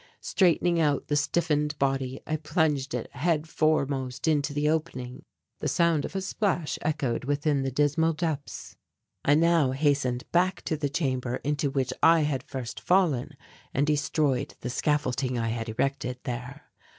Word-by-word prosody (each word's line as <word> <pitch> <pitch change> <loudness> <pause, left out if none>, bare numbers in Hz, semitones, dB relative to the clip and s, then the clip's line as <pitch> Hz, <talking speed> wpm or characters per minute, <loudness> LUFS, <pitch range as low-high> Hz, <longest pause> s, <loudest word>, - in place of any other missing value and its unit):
Straightening 175 -2 +2
out 145 -3 +1
the 145 - +2
stiffened 150 -1 +1
body 135 -1 -1
I 155 - -1
plunged 150 -4 0
it 120 - -5
head 155 +2 0
foremost 140 -5 0
into 150 -2 +2
the 145 +1 0
opening. 150 -6 -2 0.4
The - - -2
sound 170 -4 +2
of - - -8
a 190 - 0
splash 190 -4 -1
echoed 135 -7 -1
within 145 0 +1
the 135 - -1
dismal 150 +4 +2
depths. 155 -3 -4 0.5
I 145 - +4
now 165 -4 +3
hastened 135 -3 +1
back 180 +2 +2
to 160 - -1
the 145 -2 -2
chamber 130 -4 -1
into 145 0 0
which 135 -2 -1
I 165 0 +6
had 145 -3 0
first 130 -4 -6
fallen 155 -7 +1 0.4
and 140 +2 +3
destroyed 145 -2 0
the 120 - -3
scaffolding 130 -3 0
I 115 -1 -1
had 115 0 -3
erected 125 +2 -1
there. 125 +2 -6
145 Hz, 155 wpm, -27 LUFS, 130-155 Hz, 0.5 s, I